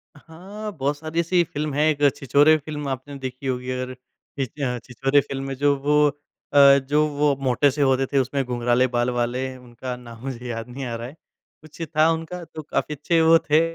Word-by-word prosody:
हाँ, 190 Hz, +8 st, -9 dB
बहुत 140 Hz, +1 st, -1 dB
सारी 160 Hz, +2 st, -4 dB
ऐसी 175 Hz, +1 st, +2 dB
फ़िल्म 150 Hz, -2 st, -4 dB
है। 150 Hz, +2 st, +2 dB
एक 145 Hz, -1 st, +3 dB
छिछोरे 145 Hz, +3 st, +4 dB
फ़िल्म 150 Hz, -1 st, -6 dB
आपने 135 Hz, +2 st, -5 dB
देखी 130 Hz, 0 st, -6 dB
होगी 125 Hz, 0 st, -2 dB
और 130 Hz, -, -4 dB
अ, 130 Hz, -, -9 dB, 0.9 s
छिछोरे 135 Hz, +3 st, +2 dB
फ़िल्म 135 Hz, 0 st, -5 dB
में 135 Hz, -, -4 dB
जो 145 Hz, +1 st, +2 dB
वो 150 Hz, +1 st, +3 dB, 0.5 s
अ, 140 Hz, -1 st, +8 dB
जो 150 Hz, +1 st, +3 dB
वो 145 Hz, -1 st, +2 dB
मोटे 130 Hz, +2 st, +3 dB
से 145 Hz, +2 st, -3 dB
होते 135 Hz, -1 st, +3 dB
थे 140 Hz, -, +3 dB
उसमें 135 Hz, +1 st, 0 dB
घुंघराले 125 Hz, +1 st, +1 dB
बाल 120 Hz, 0 st, 0 dB
वाले 120 Hz, +2 st, -1 dB
उनका 125 Hz, 0 st, -7 dB
नाम 120 Hz, -2 st, -12 dB
मुझे 125 Hz, -2 st, -6 dB
याद 115 Hz, 0 st, -5 dB
नहीं 135 Hz, +2 st, -6 dB
आ 120 Hz, -2 st, -4 dB
रहा 115 Hz, +1 st, -6 dB
है। 135 Hz, -, -11 dB, 0.5 s
कुछ 155 Hz, +2 st, -14 dB
था 155 Hz, +1 st, +5 dB
उनका 165 Hz, +2 st, -4 dB
तो 160 Hz, -, -9 dB
काफ़ी 150 Hz, 0 st, -2 dB
अच्छे 165 Hz, +4 st, +1 dB
वो 165 Hz, +1 st, +6 dB
थे 155 Hz, +2 st, +6 dB
140 Hz, 200 wpm, -23 LUFS, 125-150 Hz, 0.9 s, अ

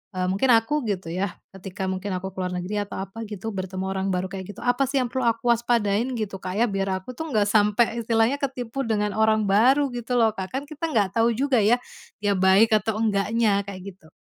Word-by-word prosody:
eee, 185 Hz, 0 st, 0 dB
mungkin 200 Hz, +8 st, +1 dB
aku 260 Hz, +7 st, +1 dB
gitu 185 Hz, -5 st, -3 dB
yah, 185 Hz, +1 st, -2 dB, 0.2 s
ketika 190 Hz, 0 st, -5 dB
mungkin 190 Hz, +1 st, -4 dB
aku 190 Hz, +1 st, -5 dB
ke 190 Hz, -, -28 dB
luar 180 Hz, 0 st, -2 dB
negeri 190 Hz, +4 st, -3 dB
atau -, -, -8 dB
apa 220 Hz, +3 st, -8 dB
gitu 210 Hz, +1 st, -5 dB
bertemu 190 Hz, -1 st, -4 dB
orang 190 Hz, 0 st, -2 dB
baru 180 Hz, +1 st, -2 dB
kayak 190 Hz, -1 st, -6 dB
gitu, -, -, -11 dB
apa 245 Hz, +2 st, +2 dB
sih 275 Hz, -, -4 dB
yang 240 Hz, -, -5 dB
perlu 260 Hz, -2 st, 0 dB
aku 230 Hz, +1 st, +2 dB
waspadain, 230 Hz, -1 st, +1 dB
gitu 205 Hz, -4 st, -4 dB
Kak 185 Hz, 0 st, -5 dB
ya, 235 Hz, +3 st, +3 dB
biar 195 Hz, 0 st, -1 dB, 0.2 s
aku 255 Hz, -, -8 dB
tuh 320 Hz, +6 st, -6 dB
nggak 210 Hz, -, +4 dB
sampai 215 Hz, +2 st, +2 dB
istilahnya 230 Hz, +4 st, +1 dB
ketipu 265 Hz, -2 st, -3 dB
dengan 210 Hz, -2 st, 0 dB
orang 220 Hz, 0 st, +3 dB
baru 250 Hz, +8 st, +3 dB
gitu 245 Hz, 0 st, -3 dB
loh, 225 Hz, -2 st, +4 dB
Kak? 190 Hz, +2 st, -6 dB
Kan 275 Hz, -, -2 dB
kita 305 Hz, +3 st, -5 dB
nggak 205 Hz, -5 st, +2 dB
tahu 230 Hz, 0 st, +3 dB
juga 265 Hz, -1 st, +2 dB
ya, 215 Hz, +4 st, +4 dB, 0.5 s
dia 205 Hz, -, +2 dB
baik 190 Hz, +4 st, +4 dB
atau 215 Hz, +1 st, -2 dB
enggaknya, 210 Hz, 0 st, +2 dB
kayak 190 Hz, -2 st, -7 dB
gitu. 160 Hz, -, -22 dB
215 Hz, 225 wpm, -24 LUFS, 195-235 Hz, 0.5 s, nggak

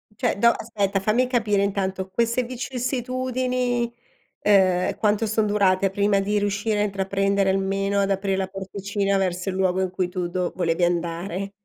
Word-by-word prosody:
Cioè -, -, 0 dB
do 235 Hz, +3 st, +5 dB
aspetta 205 Hz, -4 st, -1 dB
fammi 225 Hz, +6 st, +2 dB
capire 220 Hz, -5 st, +1 dB
intanto 190 Hz, -1 st, -2 dB
queste 235 Hz, +4 st, +1 dB
vicissitudini, 250 Hz, -1 st, -2 dB, 0.5 s
ehm, 185 Hz, -3 st, +3 dB
quanto 210 Hz, +1 st, +1 dB
son 220 Hz, 0 st, +1 dB
durate 195 Hz, -2 st, +2 dB
prima 200 Hz, +1 st, +2 dB
di 205 Hz, +1 st, 0 dB
riuscire 205 Hz, +1 st, -1 dB
a -, -, +3 dB
intraprendere, 195 Hz, 0 st, 0 dB
almeno 195 Hz, +1 st, 0 dB
ad 200 Hz, 0 st, +1 dB
aprire 195 Hz, 0 st, 0 dB
la 190 Hz, -, -1 dB
porticina 195 Hz, +1 st, -2 dB
verso 185 Hz, 0 st, -1 dB
il 185 Hz, -, -3 dB
luogo 190 Hz, 0 st, +1 dB
in 185 Hz, -, -1 dB
cui 185 Hz, -1 st, -1 dB
tu 180 Hz, -1 st, -3 dB
do 180 Hz, 0 st, -2 dB
volevi 170 Hz, -1 st, 0 dB
andare? 175 Hz, +3 st, -1 dB
200 Hz, 160 wpm, -24 LUFS, 190-215 Hz, 0.5 s, do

